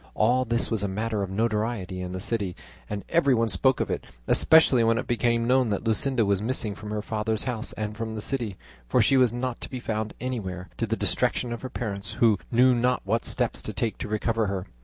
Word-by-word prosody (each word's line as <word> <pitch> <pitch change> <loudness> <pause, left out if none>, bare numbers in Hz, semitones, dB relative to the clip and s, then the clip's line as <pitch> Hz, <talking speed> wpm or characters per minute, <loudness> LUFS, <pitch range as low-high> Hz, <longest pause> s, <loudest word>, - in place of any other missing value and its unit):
All 125 +4 +3
this 115 +1 +1
was 110 -3 +1
a 100 - 0
matter 105 +2 -2
of 100 - -2
notoriety 105 -3 -1
in 90 0 -5
the 95 - -4
city, 100 -2 -1 0.3
and 100 -1 -4
everyone 130 -9 +3
spoke 125 +8 +3
of - - -1
it; - - -2 0.2
especially 160 -7 +5
when 115 0 +3
it - - -2
became 115 0 +1
known 125 -1 +3
that 100 0 -1
Luscinda 115 +2 +1
was 100 -1 +1
missing 110 -2 -1
from 105 +1 -9
her 105 0 -3
father's 110 0 -1
house 120 -4 -3
and 105 0 -4
from 110 0 -4
the - - -4
city, 115 -6 -2 0.3
for - - +2
she 135 - +4
was 125 -3 +5
not 120 0 -3
to - - -5
be 130 - -5
found 110 -2 -3
anywhere, 95 -8 -4
to - - -1
the - - -1
distraction 120 -2 0
of 120 - -6
her 130 - -5
parents, 100 -5 -4
who 110 -5 +3
knew 125 +2 +5
not 125 +1 +1
what 115 +4 0
steps - - 0
to - - -5
take 115 -2 -2
to - - -4
recover 110 +1 0
her. 95 -1 -3
115 Hz, 225 wpm, -26 LUFS, 105-120 Hz, 0.3 s, especially